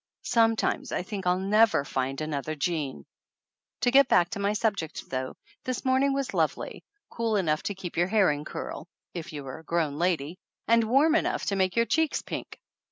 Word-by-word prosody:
Some 225 -2 +3
times - - -1
I - - -1
think 195 -1 -5
I'll 180 0 +3
never 200 -4 +3
find 135 0 -2
another 155 0 -3
Jean! 145 - -2 0.8
To 245 - +3
get 275 0 +6
back 175 -7 +4
to - - -4
my 200 +1 +1
subject, 205 -7 -2
though, 130 0 -3 0.3
this 255 0 -3
morning 265 +2 +3
was 275 -1 -2
lovely - - -1 0.3
cool 230 -2 -1
enough 155 -6 +1
to 205 - -3
keep 180 -3 -7
your 175 +1 +3
hair 200 -5 +4
in 145 0 -3
curl 155 - -6 0.3
(if 170 -3 -6
you 145 -2 -6
were 135 +3 -7
a - - -15
grown 160 -3 -1
lady) 170 -1 0 0.3
and 230 +1 +5
warm 275 +8 +4
enough 320 - +1
to 200 - 0
make 185 -1 +1
your 230 0 +3
cheeks 320 +4 +1
pink. - - -6
185 Hz, 195 wpm, -27 LUFS, 155-230 Hz, 0.8 s, get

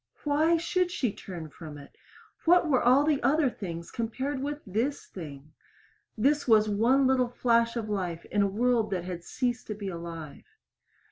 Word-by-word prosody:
Why 315 +3 +3
should 350 +2 0
she 250 - -1
turn 170 -5 -8
from 155 -2 -9
it? 140 -1 -14 0.5
What 345 0 +5
were 265 -5 +3
all 255 +4 +5
the 300 -2 +1
other 275 +1 +3
things 170 -6 -7
compared 260 +4 -3
with 290 +1 -3
this 230 +9 -2
thing? 150 -4 -10 0.6
This 285 +6 +2
was 215 -2 +5
one 235 +7 +3
little 255 -2 +3
flash 235 -1 +2
of 230 -2 -3
life 180 -5 -3
in 205 - +2
a 200 - +3
world 230 +2 +1
that 185 -3 -2
had 175 -1 -6
ceased 245 +4 -2
to 215 - -4
be 200 -1 -5
alive. 170 -4 -8
230 Hz, 175 wpm, -28 LUFS, 185-275 Hz, 0.6 s, What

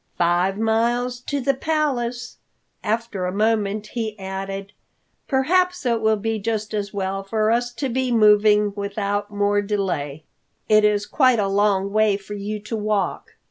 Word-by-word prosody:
Five 175 +3 +2
miles 235 +3 0
to 285 - -1
the 275 +1 +1
Palace." 265 -5 -2 0.5
After 220 -4 -2
a - - -2
moment 210 0 0
he 220 -3 -3
added, 195 +1 -6 0.5
"Perhaps 355 +5 +1
it 235 -2 +1
will 220 0 +3
be 220 +1 -2
just 215 0 -3
as 205 -2 -2
well 195 -1 -2
for 215 +2 0
us 240 +1 +1
to 270 +4 -3
be 255 0 -1
moving 210 -2 +4
without 205 0 -2
more 205 0 +1
delay. 175 -8 -2 0.4
It 215 0 +5
is 210 -1 +2
quite 255 -2 +3
a 205 -2 +1
long 200 0 +1
way 215 -2 +3
for 205 +1 -10
you 205 +1 -4
to 210 +2 -5
walk." 210 -3 -2
210 Hz, 155 wpm, -22 LUFS, 200-235 Hz, 0.5 s, It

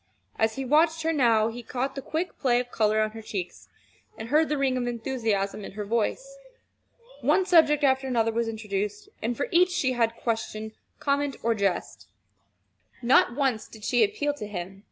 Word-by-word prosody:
As 220 0 +2
he 270 - -4
watched 320 +4 +3
her 325 0 +1
now, 230 -6 +3
he 240 +2 -7
caught 255 +3 -3
the 275 - -5
quick 330 +6 -4
play 245 -3 +3
of 245 0 -5
color 215 -1 +2
on 215 0 0
her 225 +1 -9
cheeks, 195 -4 -6 0.5
and 220 +1 -7
heard 310 +3 +3
the 300 - 0
ring 270 -2 +1
of 245 -1 -1
enthusiasm 225 -5 -2
in - - -8
her 210 0 -5
voice. - - -2 0.8
One 380 - +3
subject 310 -5 +4
after 265 -1 +3
another 230 -3 +1
was 230 +1 -1
introduced, 210 -2 -4
and 235 +2 -2
for 280 - -1
each 360 +1 +5
she 275 -7 0
had 230 -2 +1
question, 220 -2 -3 0.3
comment, 285 -1 0
or 230 +1 +2
jest. 200 -4 -2 1.0
Not 240 0 +4
once 265 -6 0
did 220 -2 -14
she 245 - +3
appeal 350 -9 0
to 210 - -6
him. 190 -1 -6
240 Hz, 185 wpm, -26 LUFS, 220-285 Hz, 1.0 s, each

